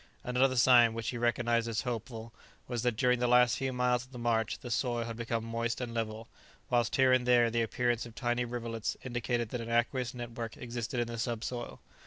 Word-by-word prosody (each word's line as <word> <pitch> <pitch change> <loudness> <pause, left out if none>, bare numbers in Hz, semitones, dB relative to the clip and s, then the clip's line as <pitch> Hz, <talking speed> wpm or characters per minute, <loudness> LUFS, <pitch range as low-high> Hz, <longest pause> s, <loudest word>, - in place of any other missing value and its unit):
Another 130 +1 +2
sign, 120 -2 +6
which 115 -1 -3
he 120 - -4
recognized 120 -1 +1
as 115 -2 -1
hopeful, 115 -2 -5 0.3
was 120 -2 -2
that 125 -1 +1
during 125 -1 +3
the 125 - +1
last 125 0 +5
few 135 -1 -1
miles 125 -1 +1
of 130 - -18
the 125 - -9
march 115 -2 0
the 120 - -8
soil 120 0 0
had 115 0 -5
become 115 -1 -3
moist 115 +1 -2
and 120 -2 -4
level, 110 -1 -3 0.4
whilst 120 -3 +2
here 130 -1 +5
and 125 -1 +2
there 120 -2 +5
the 115 0 +1
appearance 120 +1 0
of 115 - -14
tiny 120 0 0
rivulets 115 -2 -4
indicated 120 -2 -2
that 125 0 -4
an 115 - -6
aqueous 120 +2 0
network 120 -1 -6
existed 120 0 -4
in 120 - +1
the 115 0 -6
subsoil. 120 +1 -4
120 Hz, 210 wpm, -31 LUFS, 115-125 Hz, 0.4 s, sign